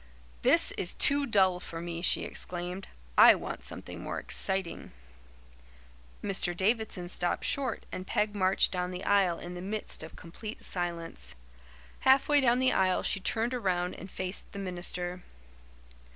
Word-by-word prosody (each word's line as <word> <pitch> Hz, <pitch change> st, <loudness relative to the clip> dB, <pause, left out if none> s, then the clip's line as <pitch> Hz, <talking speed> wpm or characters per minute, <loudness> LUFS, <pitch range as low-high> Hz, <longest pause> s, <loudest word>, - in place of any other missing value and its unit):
"This -, -, +5 dB
is 175 Hz, -, +1 dB
too 280 Hz, 0 st, +4 dB
dull 190 Hz, -4 st, +3 dB
for 165 Hz, -2 st, -7 dB
me," 170 Hz, 0 st, -5 dB
she 175 Hz, -, +3 dB
exclaimed. 180 Hz, +2 st, -4 dB, 0.3 s
"I -, -, +10 dB
want -, -, -6 dB
something -, -, -6 dB
more -, -, -4 dB
exciting." 190 Hz, -, 0 dB, 1.3 s
Mr. 185 Hz, -3 st, 0 dB
Davidson 205 Hz, -2 st, 0 dB
stopped 175 Hz, 0 st, -1 dB
short 265 Hz, -5 st, -1 dB
and 185 Hz, +1 st, -6 dB
Peg 210 Hz, 0 st, 0 dB
marched 190 Hz, -1 st, +3 dB
down 180 Hz, -1 st, -2 dB
the 180 Hz, +1 st, -6 dB
aisle 195 Hz, -4 st, +3 dB
in 175 Hz, -, -7 dB
the 180 Hz, -, -7 dB
midst 210 Hz, +3 st, -4 dB
of 160 Hz, -, -9 dB
complete 210 Hz, +6 st, -9 dB
silence. 165 Hz, -, -4 dB, 0.6 s
Half 265 Hz, +1 st, +4 dB
way 290 Hz, -1 st, +5 dB
down 245 Hz, -2 st, +4 dB
the 260 Hz, 0 st, +3 dB
aisle 185 Hz, -1 st, +2 dB
she -, -, 0 dB
turned 225 Hz, +5 st, -1 dB
around 180 Hz, -7 st, -1 dB
and 190 Hz, -, -10 dB
faced 185 Hz, +1 st, -3 dB
the -, -, -7 dB
minister. 180 Hz, -1 st, -3 dB
185 Hz, 150 wpm, -30 LUFS, 175-210 Hz, 1.3 s, I